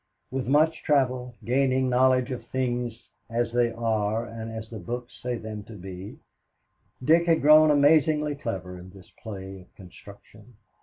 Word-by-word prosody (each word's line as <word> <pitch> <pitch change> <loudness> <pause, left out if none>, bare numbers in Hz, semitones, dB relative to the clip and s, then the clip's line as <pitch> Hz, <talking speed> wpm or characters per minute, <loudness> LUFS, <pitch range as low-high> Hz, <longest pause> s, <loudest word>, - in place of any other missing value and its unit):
With 130 -1 -3
much 155 +4 +3
travel, 125 -4 0
gaining 130 +1 +2
knowledge 130 +1 +3
of 120 -2 -6
things 120 -3 -3 0.2
as 115 0 -1
they 120 -1 +2
are 110 -1 -1
and 115 -1 -7
as 110 -1 -7
the 110 -1 -8
books 120 +7 -6
say 125 0 -2
them 110 -1 -7
to 115 - -11
be, 95 0 -9 0.9
Dick 165 +5 +4
had 165 -1 +3
grown 155 +1 +7
amazingly 150 +1 +3
clever 95 -9 -6
in 90 +1 -12
this 95 0 -16
play 95 -3 -8
of 90 - -22
construction. 105 +4 -15
120 Hz, 155 wpm, -26 LUFS, 110-130 Hz, 0.9 s, grown